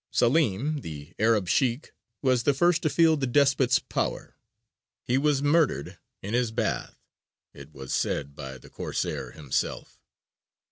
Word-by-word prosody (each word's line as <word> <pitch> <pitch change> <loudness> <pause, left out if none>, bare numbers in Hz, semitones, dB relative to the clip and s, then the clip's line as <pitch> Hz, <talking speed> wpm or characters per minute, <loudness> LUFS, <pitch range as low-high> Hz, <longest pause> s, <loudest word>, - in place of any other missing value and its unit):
Salim, 140 +2 +1
the 75 - -9
Arab 110 -3 +2
Sheykh, 125 - 0 0.3
was 130 -2 +3
the 140 +3 +2
first 175 +2 +3
to 155 - +1
feel 165 0 +4
the 135 -2 -1
despot's 135 -1 +3
power: - - -3 0.7
he 125 - 0
was 140 0 +2
murdered 145 - +1 0.2
in 100 +3 -5
his 120 -1 +1
bath 110 - -2 0.6
it 70 +1 -12
was 65 -3 -7
said 70 0 -1
by 65 -2 -7
the 60 - -16
Corsair - - -4
himself. 70 -4 -3
125 Hz, 140 wpm, -27 LUFS, -, 0.7 s, feel